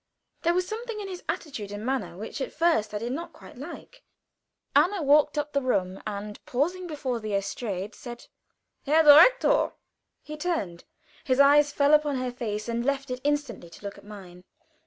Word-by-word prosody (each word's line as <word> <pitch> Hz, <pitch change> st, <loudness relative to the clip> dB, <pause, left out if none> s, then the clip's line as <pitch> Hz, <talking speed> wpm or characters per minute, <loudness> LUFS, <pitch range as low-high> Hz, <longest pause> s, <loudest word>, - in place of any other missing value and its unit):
There 340 Hz, +1 st, +2 dB
was 365 Hz, 0 st, +1 dB
something 455 Hz, 0 st, -5 dB
in 405 Hz, -, -5 dB
his 365 Hz, -2 st, -8 dB
attitude 230 Hz, -11 st, -4 dB
and 205 Hz, +2 st, -6 dB
manner 245 Hz, -10 st, -2 dB
which 220 Hz, +7 st, -6 dB
at -, -, -3 dB
first 315 Hz, -10 st, +1 dB
I 210 Hz, -, -3 dB
did 235 Hz, +3 st, -4 dB
not 330 Hz, +6 st, -5 dB
quite -, -, -14 dB
like. -, -, -10 dB, 0.7 s
Anna 345 Hz, +5 st, +3 dB
walked 295 Hz, +1 st, +4 dB
up 295 Hz, 0 st, -2 dB
the 280 Hz, -, +1 dB
room, 190 Hz, -7 st, -1 dB
and 210 Hz, 0 st, -6 dB
pausing 350 Hz, +8 st, -1 dB
before 275 Hz, -6 st, -3 dB
the 215 Hz, -2 st, -3 dB
estrade, 200 Hz, 0 st, -3 dB
said: 240 Hz, -1 st, -10 dB, 0.6 s
"Herr 315 Hz, +3 st, +5 dB
Direktor!" 425 Hz, +12 st, +6 dB, 0.5 s
He 305 Hz, 0 st, -8 dB
turned: 295 Hz, -, -3 dB, 0.4 s
his 255 Hz, 0 st, 0 dB
eyes 290 Hz, +1 st, +6 dB
fell 285 Hz, +1 st, +3 dB
upon 300 Hz, -2 st, +3 dB
her 255 Hz, -1 st, -2 dB
face, 215 Hz, -3 st, -4 dB
and 235 Hz, 0 st, -2 dB
left 275 Hz, 0 st, -1 dB
it 250 Hz, 0 st, -4 dB
instantly 285 Hz, -11 st, -2 dB
to 170 Hz, -, -15 dB
look 200 Hz, -, -7 dB
at -, -, -18 dB
mine. 185 Hz, -4 st, -12 dB
270 Hz, 180 wpm, -26 LUFS, 210-305 Hz, 0.7 s, Direktor